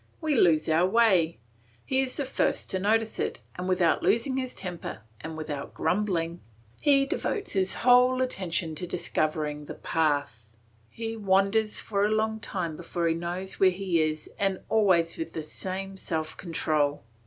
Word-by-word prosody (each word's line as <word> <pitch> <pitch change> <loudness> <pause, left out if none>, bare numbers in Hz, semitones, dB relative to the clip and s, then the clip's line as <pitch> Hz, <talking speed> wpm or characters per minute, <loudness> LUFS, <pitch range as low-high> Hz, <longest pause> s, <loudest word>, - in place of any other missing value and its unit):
We 315 -2 0
lose 165 - +4
our 165 +3 +3
way; 190 -6 +3 0.5
he 265 0 +2
is 260 -1 -3
the 285 - -1
first 260 - 0
to 190 - -1
notice 220 +3 +1
it, - - -2 0.2
and 180 +1 -4
without 180 -3 +3
losing 260 +3 +2
his 255 -1 -3
temper, 175 -10 -6 0.2
and 160 +3 -7
without 150 -3 -5
grumbling, 175 -4 0 0.4
he 275 -2 +5
devotes 405 - -2
his 190 -2 +2
whole 250 +1 +6
attention 175 -8 -2
to 175 +4 -4
discovering 150 -3 -1
the - - -7
path; 145 -9 -1 0.4
he 225 0 -5
wanders 205 +1 +2
for 200 -2 -1
a 210 - +3
long 220 0 0
time 175 -7 -3
before 170 +1 -2
he 165 - +3
knows 175 +3 -4
where 190 - +6
he 180 -3 0
is 155 0 -1
and 195 -2 0
always 185 -6 +3
with 325 - -4
the 160 - -4
same 190 +5 -5
self 160 -4 -3
control. 155 -4 -1
185 Hz, 165 wpm, -27 LUFS, 160-220 Hz, 0.5 s, whole